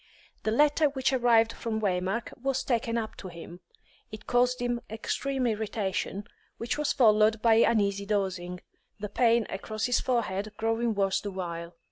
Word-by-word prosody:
The - - -1
letter 295 +5 +3
which 265 -1 0
arrived 230 -3 +4
from 225 -2 -3
Waymark 195 +2 -1
was 270 0 0
taken 235 -1 0
up 220 -1 -3
to - - -8
him. 170 0 -10 0.5
It 215 0 -9
caused 250 +1 +2
him 240 -1 -1
extreme 260 +4 -2
irritation, 205 -3 -2 0.3
which 230 - -2
was 300 -1 0
followed 215 -2 +4
by 225 -1 +5
uneasy 200 -3 +2
dozing, 185 -3 -2 0.4
the 210 0 -5
pain 235 -1 +3
across 215 +3 -4
his 245 -1 +2
forehead 215 -4 -1
growing 225 0 0
worse 195 -1 +1
the 205 - -4
while. 170 -3 -6
220 Hz, 155 wpm, -28 LUFS, 200-240 Hz, 0.5 s, by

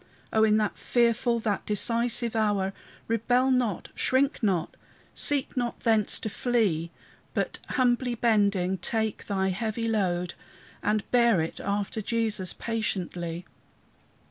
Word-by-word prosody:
O 220 - +4
in 215 -1 +4
that 210 -1 -1
fearful, 235 0 +2
that 210 -3 -1
decisive 230 +2 +2
hour, 205 -3 +1 0.3
Rebel 245 +3 +2
not, 245 -7 0
shrink 270 +2 +1
not, 185 -7 0 0.4
seek 285 -2 +2
not 240 -2 -2
thence 220 -3 +2
to - - -3
flee, 210 -8 0 0.5
But, - - -1 0.2
humbly 245 -1 +2
bending, 200 -5 +2
take 220 +3 -2
thy 190 -1 0
heavy 220 +4 -2
load, 180 -5 0 0.5
And 210 0 0
bear 235 -6 +4
it 160 0 -3
after 200 +2 -2
Jesus 215 -4 -1
patiently. 180 -6 -3
220 Hz, 120 wpm, -27 LUFS, 195-235 Hz, 0.5 s, O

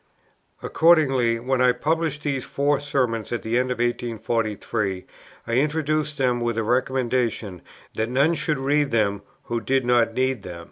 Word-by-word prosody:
Accordingly, 135 -8 +3
when 130 +2 0
I 125 -1 +5
published 160 -1 -1
these 135 -3 -1
Four 145 0 0
Sermons 125 -6 -1
at 120 - -3
the 115 +2 +1
end 130 0 -1
of 125 - -2
1843, 115 -4 -2 0.4
I 115 - -4
introduced 150 +2 0
them 125 -2 +1
with 120 -1 -1
a 115 - 0
recommendation 120 -5 -1 0.3
that 110 +1 -2
none 140 +6 +3
should 150 -1 -1
read 145 +2 +1
them 100 -3 +1 0.2
who 115 -1 -3
did 130 +2 0
not 120 -2 +2
need 130 -3 0
them. 90 -3 -8
125 Hz, 155 wpm, -23 LUFS, 115-140 Hz, 0.4 s, I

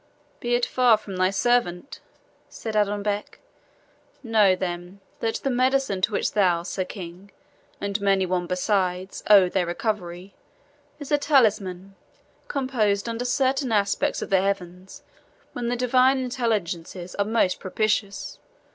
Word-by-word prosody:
"Be 240 0 0
it 240 - +2
far 245 -3 +4
from 200 -3 -9
thy 185 0 +3
servant!" 195 0 0 0.5
said 220 -2 -6
Adonbec. 205 0 -1 0.9
"Know, 215 -5 +4
then, 180 +1 -5 0.2
that 225 0 -1
the 275 - -2
medicine 255 -5 +1
to 190 - +1
which - - -1
thou, 180 -5 +2
Sir 185 +1 -3
King, 180 +1 -9 0.5
and 200 0 -2
many 195 -1 +2
one 180 -1 -1
besides, 185 0 -1
owe 200 -3 +8
their 180 -1 -1
recovery, 180 -1 -4 0.6
is 290 -1 -9
a 295 - +3
talisman, 205 - +1 0.5
composed 235 -7 0
under 230 +1 -3
certain 260 +1 +1
aspects 200 -2 +1
of - - -8
the 190 -1 +4
heavens, 190 -1 -4 0.5
when 240 -1 -3
the 245 - 0
Divine 255 +2 +3
Intelligences 200 -9 -3
are 200 - 0
most 215 -4 +1
propitious. 205 0 -2
200 Hz, 135 wpm, -24 LUFS, 185-240 Hz, 0.9 s, owe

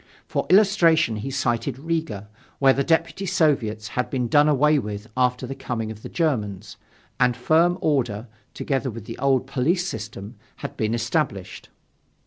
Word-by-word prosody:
For - - -2
illustration 175 - +4
he 110 +6 -4
cited 130 -2 -1
Riga, 150 -10 -3 0.3
where 135 -1 +5
the 140 - 0
Deputy 170 +5 0
Soviets 125 - +1
had 125 - -2
been 125 -3 -1
done 145 +4 +5
away 150 +1 +4
with 105 -2 -5
after 125 0 +1
the 130 - -5
coming 120 -5 -4
of 110 -1 -10
the - - -8
Germans, 105 - -2 0.4
and 125 -1 +3
firm 165 +7 +3
order, 120 -7 0 0.3
together 135 -1 -1
with 115 -2 -8
the 115 - -8
old 135 -2 +2
police 155 +8 0
system, 105 - -7 0.2
had - - -7
been 110 +1 -1
established. 120 - -2
130 Hz, 155 wpm, -23 LUFS, 110-150 Hz, 0.4 s, where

